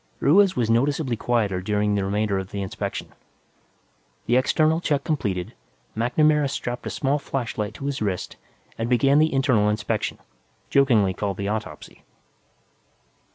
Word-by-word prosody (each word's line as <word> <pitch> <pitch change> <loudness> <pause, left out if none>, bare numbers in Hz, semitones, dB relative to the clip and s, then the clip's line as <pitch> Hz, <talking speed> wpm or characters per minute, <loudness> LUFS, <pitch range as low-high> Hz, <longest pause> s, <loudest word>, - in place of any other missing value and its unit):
Ruiz 190 +6 +4
was 120 -3 +1
noticeably 130 +3 +1
quieter 105 -5 0
during 105 +1 0
the 100 -1 0
remainder 100 0 0
of 95 0 -6
the 100 -1 -4
inspection. 95 - -5 1.2
The 120 - +2
external 155 +5 +2
check 145 -4 0
completed, 100 - -2 0.4
MacNamara 150 +5 +2
strapped 125 -3 -4
a - - -2
small 140 +2 0
flashlight 115 -7 -4
to 140 - -7
his 140 -3 -3
wrist 95 -4 -2 0.4
and 115 +1 -2
began 135 +4 +4
the 155 +1 +3
internal 130 -6 +2
inspection, 105 0 -2 0.5
jokingly 115 -9 +4
called 100 0 -3
the 100 0 -2
autopsy. 105 -8 -6
115 Hz, 140 wpm, -24 LUFS, 105-140 Hz, 1.2 s, Ruiz